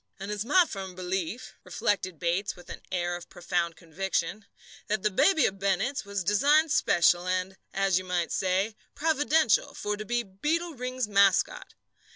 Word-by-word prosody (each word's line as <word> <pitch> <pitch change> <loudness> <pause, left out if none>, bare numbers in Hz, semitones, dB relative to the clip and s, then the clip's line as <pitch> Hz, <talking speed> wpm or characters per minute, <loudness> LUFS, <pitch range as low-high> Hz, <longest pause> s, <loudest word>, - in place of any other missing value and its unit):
"And 195 +2 -5
it's 210 0 -2
my 345 +9 +5
firm 190 - -7
belief," 185 +6 -4
reflected 185 -4 -1
Bates 175 +4 -1
with 175 0 -12
an - - -8
air 175 -1 -1
of 175 -1 -9
profound 175 -1 -2
conviction, 190 +4 -3 0.4
"that 215 -1 -1
that 210 -3 0
baby 320 - +4
of 195 0 -1
Bennett's 200 +7 0
was 200 -1 -3
designed 290 - +3
special 175 - +3
and, 185 +1 -1 0.2
as 195 -2 +2
you - - -7
might 180 -2 -1
say, 190 +3 0 0.2
providential, 310 -4 +2
for 210 0 -2
to 215 - -5
be 240 +3 -1
Beetle 310 - -2
Ring's 255 -2 -3
mascot. 200 -2 +2
195 Hz, 165 wpm, -28 LUFS, 185-240 Hz, 0.4 s, my